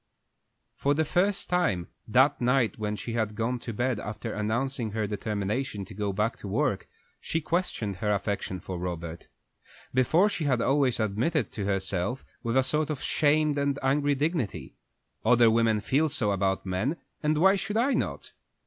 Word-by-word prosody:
For 145 +1 +1
the 160 +1 +1
first 190 +6 +1
time, 175 - +1 0.2
that 130 +5 +4
night 125 -2 +2
when 105 -1 -1
she 115 +2 -5
had 110 -2 -1
gone 120 +3 -1
to 115 - -5
bed, 120 +1 -1
after 105 +2 -5
announcing 115 +2 -1
her 110 -1 0
determination 105 +2 -2
to 105 - -11
go 100 0 -2
back 105 +4 -1
to - - -7
work, 105 -1 0 0.3
she 165 - -2
questioned 155 - -2
her 105 +2 0
affection 100 -2 -2
for 90 +1 -6
Robert. 85 -2 -5 0.7
Before 155 - +4
she 175 -6 -2
had 130 -4 +2
always 135 -1 +2
admitted 115 +7 +1
it - - -31
to 100 - -4
herself 95 +4 -1 0.2
with 115 +1 0
a 130 - +5
sort 150 +2 0
of 150 -4 -3
shamed 150 0 +2
and 140 0 0
angry 145 +2 +2
dignity. 145 - -2 0.5
"Other 115 0 +5
women 115 -1 +3
feel 145 +8 +2
so 120 -8 0
about 95 -1 0
men, 100 - -1 0.2
and 150 0 +1
why 190 +5 +5
should 205 +2 -2
I 260 +4 +3
not?" - - -2
120 Hz, 175 wpm, -28 LUFS, 105-145 Hz, 0.7 s, a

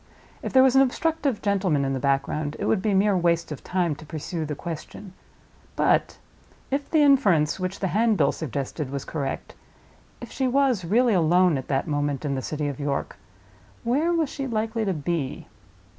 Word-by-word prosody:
If - - -4
there 260 0 +6
was 265 -1 +4
an 270 - +7
obstructive 280 -1 0
gentleman 190 -9 +1
in 135 - -1
the 135 - -2
background, 145 +2 -1
it - - -3
would 200 - +1
be 205 0 +1
mere 200 +1 +3
waste 170 -2 +1
of 150 - -7
time 180 -4 0
to - - -11
pursue 160 +2 -5
the 150 - -3
question. 175 +5 -8 0.6
But - - +2 0.5
if 280 +1 -2
the 310 -2 +4
inference 200 - +3
which 185 +1 -3
the 190 - -1
handbill 215 -8 +3
suggested 140 0 -4
was 140 0 -5
correct—if 140 -4 -8
she 265 -2 -1
was 255 -6 +2
really 230 +6 +3
alone 175 0 +4
at 130 -1 -4
that 135 -1 0
moment 145 -1 -1
in 140 - -1
the 130 - -2
city 150 +2 -3
of 140 -1 -5
York—where 235 - -4
was 330 -4 +1
she 275 -2 -4
likely 220 -1 -1
to 195 - 0
be? 150 -2 -3
180 Hz, 175 wpm, -25 LUFS, 145-235 Hz, 0.6 s, an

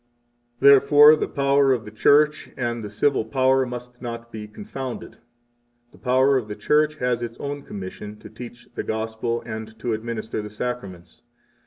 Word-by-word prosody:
12 140 +3 +7
Therefore 145 +2 +7
the - - -2
power 140 0 +2
of 120 -4 0
the 105 - -9
Church 150 +8 +3
and 120 -2 -2
the 105 - -6
civil 110 +5 +1
power 130 +2 +2
must 125 0 -8
not 115 -1 -7
be 105 -1 -7
confounded. 135 - -7 0.7
The - - -19
power 130 +2 +3
of 120 -4 -3
the 105 - -6
Church 150 +8 +2
has 125 -4 -1
its 115 -1 -5
own 145 0 -5
commission 105 0 -8
to - - -12
teach 120 -1 -11
the - - -3
Gospel 110 +1 -3
and 110 -1 -5
13 110 0 -18
to 120 - -1
administer 110 0 -4
the 105 - -7
Sacraments. 105 -6 -6
120 Hz, 175 wpm, -23 LUFS, 110-135 Hz, 0.7 s, 12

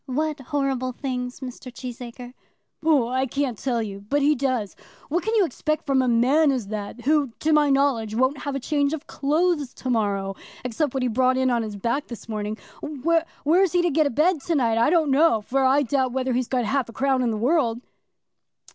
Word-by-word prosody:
"What 300 +3 -1
horrible 270 -2 -2
things, 250 -1 -4
Mr. 255 0 -8
Cheesacre?" 245 0 -8 0.5
"Oh, 290 -7 +3
I 260 +1 0
can't 275 -1 -1
tell 235 0 -1
you; 200 -2 -6
but 290 0 +2
he 295 +2 +5
does. 255 -7 -1 0.3
What 340 +4 0
can 445 +1 0
you 415 -4 +4
expect 305 +1 -2
from 275 -2 +2
such 260 - +2
a - - +2
man 270 +6 +4
as 245 -7 -3
that, 215 +2 -5
who, 285 -2 +1
to 315 0 +2
my 300 -1 +4
knowledge, 270 -6 +1
won't 260 +4 +1
have 285 -2 -4
a - - -1
change 285 +2 0
of 320 -1 -5
clothes 300 -1 0
to 255 - -3
morrow, 200 -4 0 0.3
except 255 +3 -1
what 265 - 0
he - - +2
brought 255 +2 +2
in 260 -1 +2
on 240 -1 +1
his 215 -2 -5
back 235 +8 -2
this 235 -2 -9
morning. 215 -1 -3 0.2
Where 315 +3 0 0.2
he's 355 +4 +3
to 350 -1 +2
get 305 +1 +3
a - - -1
bed 310 +5 +2
to 335 - +1
night, 230 -5 +2
I 235 - +4
don't 315 -4 +3
know, 285 -4 +4
for 265 +6 0
I 270 +2 +4
doubt 260 -1 0
whether 260 -1 -1
he's 250 0 0
got 250 -3 0
half 255 +2 0
a - - -10
crown 265 0 +1
in 245 - +1
the 220 - -1
world." 240 -1 +1
265 Hz, 220 wpm, -24 LUFS, 240-295 Hz, 0.5 s, he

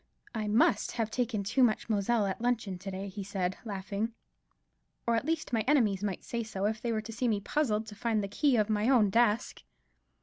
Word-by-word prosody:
"I 220 -2 -2
must 210 -1 +3
have 225 -2 -1
taken 235 -4 -1
too 230 +7 +1
much 235 -4 +3
Moselle 215 0 +1
at 195 +2 -3
luncheon 230 -6 -1
to 195 +2 -6
day," 195 +1 -5
he 200 +1 -6
said, 190 -2 -2
laughing, 205 +1 -3 0.9
"or, 235 - +2
at 230 - 0
least, 320 -5 -1
my 225 - +3
enemies 215 -9 +3
might 195 -3 -2
say 235 - -3
so, 205 -3 -3
if 215 +1 -1
they 235 - -1
were 220 -1 0
to 225 +1 -8
see 245 +3 -1
me 215 -3 +1
puzzled 220 -2 0
to 215 - -9
find 220 -1 0
the - - -2
key 265 +7 +2
of 215 -3 +3
my 215 +2 +1
own 225 -7 +4
desk." 230 0 +2
215 Hz, 215 wpm, -30 LUFS, 200-235 Hz, 0.9 s, own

